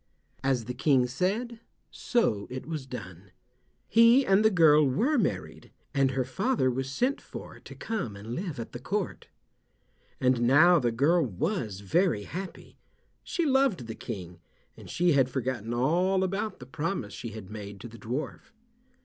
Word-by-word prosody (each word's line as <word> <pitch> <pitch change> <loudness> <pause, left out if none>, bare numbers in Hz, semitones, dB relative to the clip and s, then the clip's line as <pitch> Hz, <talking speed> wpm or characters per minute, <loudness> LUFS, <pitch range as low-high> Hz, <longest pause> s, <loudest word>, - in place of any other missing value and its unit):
As 130 -4 +1
the 125 - -4
King 135 0 +3
said, 200 - -2 0.3
so 115 - 0
it 130 +1 -6
was 155 -5 -5
done. 95 -7 -9 0.6
He 230 - +6
and 195 +2 +4
the 220 - +6
girl 160 -6 +5
were 220 - +1
married, 200 - -3 0.2
and 135 -2 +3
her 130 0 0
father 190 - 0
was 130 +1 -3
sent 255 - 0
for - - -10
to - - -12
come 210 - -4
and 105 +4 -7
live 165 -1 -4
at 115 - -6
the 120 - -7
court. 195 +8 -3 0.9
And 130 -2 +2
now 155 +8 +6
the 120 -4 0
girl 155 +9 +3
was 120 - -3
very 130 - +1
happy. 180 - -8 0.4
She 345 - -1
loved 265 - +2
the 110 - -6
King, 90 -7 -7 0.4
and - - -13
she 175 0 +2
had 135 -3 +3
forgotten 125 -3 -3
all 175 +10 +2
about 195 +3 -2
the 125 - -11
promise 150 - -3
she 115 - -6
had 105 -3 -9
made 100 -2 -8
to 120 - -7
the 115 0 -13
dwarf. 130 - -5
135 Hz, 165 wpm, -28 LUFS, 120-190 Hz, 0.9 s, He